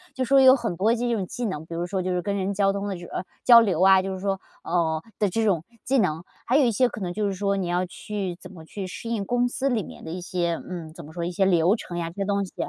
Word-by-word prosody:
就 260 - -1
说 270 +2 +5
有 260 0 +8
很 230 -9 -3
多 220 +6 +3
这 240 0 -1
种 195 -5 -2
技 245 - -4
能， 160 -7 -4
比 165 - -7
如 170 +1 -2
说 185 +1 -2
就 185 - -2
是 180 0 0
跟 200 +2 -2
人 195 +1 -1
交 195 0 +2
通 200 +1 -3
的 195 - -3
时 175 - -9
啊， - - -4 0.2
交 240 -2 +9
流 195 -7 +1
啊， 190 0 +7
就 190 0 -4
是 190 - -6
说 195 -1 -1 0.2
哦， 165 -2 0 0.2
的 205 - +2
这 225 +5 0
种 190 -7 +2 0.2
技 270 - +1
能。 170 -7 +1 0.2
还 250 - +1
有 295 - +5
一 235 - +3
些 250 +4 +3
可 215 - -8
能 180 - -2
就 210 +2 -1
是 195 - -1
说 200 +1 0
你 190 -2 -2
要 175 +1 0
去 185 0 -5
怎 - - -11
么 165 -3 -11
去 190 +4 -6
适 230 +5 -7
应 220 -4 -1
公 245 +3 +1
司 265 +2 -2
里 235 -7 +1
面 - - -11
的 160 - -6
一 180 +2 -5
些， 175 -1 -1 0.2
嗯， 165 -3 -6
怎 170 0 -10
么 155 - -12
说， 170 +1 -4
一 175 - -2
些 185 +2 +1
流 180 +1 +4
程 175 -6 -7
呀， 170 -1 -2
这 165 - -15
些 200 - -2
东 200 0 0
西。 185 - -14
190 Hz, 330 characters per minute, -25 LUFS, 175-215 Hz, 0.2 s, 交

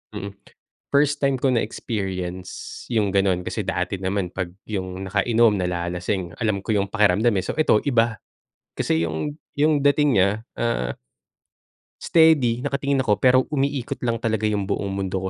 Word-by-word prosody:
mm. 100 +1 -5 0.6
First 145 0 +3
time 140 -1 +2
ko 130 +1 +1
na 120 - +3
experience 95 -5 -5
yung 110 -4 +1
gano'n. 95 -2 +2
Kasi - - -3
dati 100 - -2
naman, 95 -1 -1
pag 90 -2 -4
yung 95 -2 -4
nakainom, 110 +3 +3
nalalasing, 90 0 -2
alam 105 -4 0
ko - - -4
yung 100 -2 +1
pakiramdam, 105 +2 +3
eh. 95 - +1
So, - - -2
eto, 130 -9 +3
iba 115 -5 +2 0.6
kasi, 80 - +1
yung, 80 - -3 0.2
yung 150 0 +3
dating 145 -5 +3
niya, 95 - +4 0.3
ah, 65 - -1 1.1
steady 150 -8 +4
nakatingin 140 -1 0
ako 105 -4 +3
pero, 130 0 +5
umiikot 140 -1 -1
lang 115 -1 +1
talaga 110 -2 -1
yung 105 -2 -1
buong 100 -1 -2
mundo 95 -1 -2
105 Hz, 155 wpm, -23 LUFS, 95-130 Hz, 1.1 s, pero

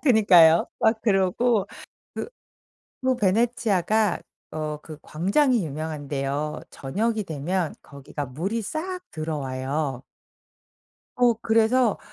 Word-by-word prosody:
그니까요. 180 - +6
막 220 0 +3
그러고 205 +2 +2 0.5
그 - - -4 0.7
그 260 -1 +2
베네치아가 215 -1 +1 0.3
어 155 -1 -3
그 155 -2 -10
광장이 205 - +1
유명한데요. 145 -1 -3
저녁이 215 +10 -2
되면 165 +2 -2
거기가 140 +1 -7
물이 185 - -3
싹 360 - -4
들어와요. 140 -3 -3 1.2
어 245 -1 +5
그래서 225 +1 +3
185 Hz, 220 characters per minute, -25 LUFS, 150-225 Hz, 1.2 s, 그니까요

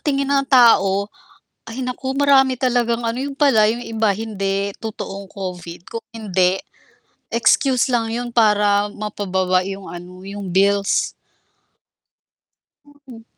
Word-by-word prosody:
tingin 275 -2 -1
ng 275 -1 +2
tao 200 -6 +5 0.6
ay 230 +3 -6
naku 260 +1 -4
marami 270 -3 +4
talagang 240 -2 0
ano, 230 - -2
yun 280 0 -5
pala, 225 -8 +4
yung 240 +2 -4
iba 220 -1 0
hindi 200 -1 -2
totoong 200 -3 -6
Covid 180 -3 -7
kung 230 - -7
hindi 190 -4 0 0.8
excuse 255 +2 +3
lang 230 -2 0
yun 240 +1 -3
para 210 -2 +3
mapababa 190 -3 -1
yung 195 0 -7
ano, 180 +1 -10
yung 200 0 -7
bills. 200 +1 +2 2.0
Mm. 230 -3 -12
215 Hz, 120 wpm, -20 LUFS, 195-245 Hz, 2.0 s, tao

